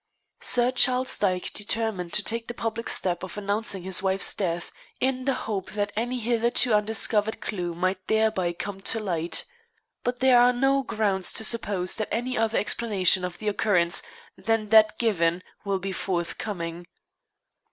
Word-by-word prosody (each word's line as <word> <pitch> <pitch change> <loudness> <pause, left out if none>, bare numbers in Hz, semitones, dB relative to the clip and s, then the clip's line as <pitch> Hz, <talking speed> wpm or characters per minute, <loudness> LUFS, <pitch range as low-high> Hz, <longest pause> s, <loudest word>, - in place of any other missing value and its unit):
Sir 245 0 +2
Charles 255 0 +4
Dyke 185 -3 0
determined 210 -4 -2
to 210 - +4
take 230 +2 -2
the 240 - -6
public 230 0 -3
step 175 -2 0
of 190 +2 -8
announcing 205 -1 -2
his 190 0 0
wife's 190 0 +1
death 175 -3 -3 0.3
in 260 -1 -1
the 270 -2 +1
hope 200 -3 -4
that 205 0 -2
any 245 +3 -2
hitherto 235 +1 +2
undiscovered 215 0 +2
clue 175 -5 -4
might 185 +2 -2
thereby 220 -5 +1
come 195 +3 -6
to 225 - +1
light. 175 -5 -2 0.6
But 245 0 -2
there 255 -2 +5
are 245 +1 +5
no 270 +2 +2
grounds 200 -7 0
to 220 - -1
suppose 205 -5 +1
that 215 - -3
any 250 +3 -2
other 225 0 0
explanation 195 -5 +2
of 180 -1 -5
the 215 - -6
occurrence 180 -5 +2 0.3
than 225 -2 -1
that 215 -1 +5
given 180 -6 0 0.2
will 200 -1 0
be 190 +1 -5
forthcoming. 175 -1 -4
210 Hz, 160 wpm, -25 LUFS, 185-230 Hz, 0.6 s, there